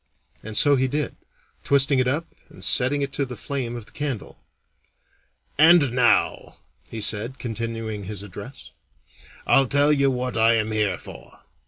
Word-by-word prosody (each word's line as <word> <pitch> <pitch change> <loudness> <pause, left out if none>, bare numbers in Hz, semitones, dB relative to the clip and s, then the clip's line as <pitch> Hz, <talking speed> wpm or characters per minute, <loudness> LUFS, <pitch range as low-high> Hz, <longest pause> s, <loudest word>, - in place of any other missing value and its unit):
And 110 0 -4
so 145 -1 +5
he 130 +1 +1
did, 145 +3 -3 0.5
twisting 140 0 +3
it 130 - +1
up 145 +6 -1 0.2
and - - -8
setting 140 +2 +3
it 140 0 -5
to 140 - -1
the 125 -2 -6
flame 125 -2 -5
of 120 -3 -8
the - - -18
candle. 140 -7 -6 1.2
"And 160 -4 +6
now," 120 -3 +1 0.3
he 115 - -7
said, 110 +5 0
continuing 115 -2 -5
his 100 0 -6
address, 105 +6 -11 0.7
"I'll 135 -1 +4
tell 145 +3 +3
you 140 -1 +2
what 125 -1 -3
I 115 +1 +4
am 110 -1 -1
here 110 -2 0
for. - - -14
125 Hz, 160 wpm, -23 LUFS, 110-140 Hz, 1.2 s, And